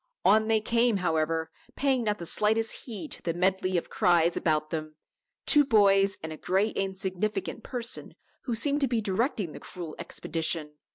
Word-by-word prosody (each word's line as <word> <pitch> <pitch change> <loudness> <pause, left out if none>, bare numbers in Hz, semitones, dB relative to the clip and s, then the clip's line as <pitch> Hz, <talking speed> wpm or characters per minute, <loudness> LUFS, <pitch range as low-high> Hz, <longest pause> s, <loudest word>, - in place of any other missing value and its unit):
On 215 +2 +5
they 220 -1 +2
came, 230 0 +2
however, 160 -2 0 0.2
paying 265 -4 +1
not 210 -1 0
the 170 - -7
slightest 220 +5 0
heed 200 - -7
to - - -3
the 165 -1 -2
medley 185 0 +1
of 170 - -4
cries 170 -1 +3
about 155 -1 0
them 155 -1 -4 0.5
two 295 -2 +7
boys 200 -5 +4
and 160 0 -4
a - - -9
gray 190 +6 +1
insignificant 195 +3 -3
person 240 0 -4 0.3
who 240 - -1
seemed 285 +5 +1
to 275 - +3
be 235 -2 0
directing 205 - -1
the - - -9
cruel 170 -4 -6
expedition. 160 -1 -2
195 Hz, 170 wpm, -28 LUFS, 170-225 Hz, 0.5 s, two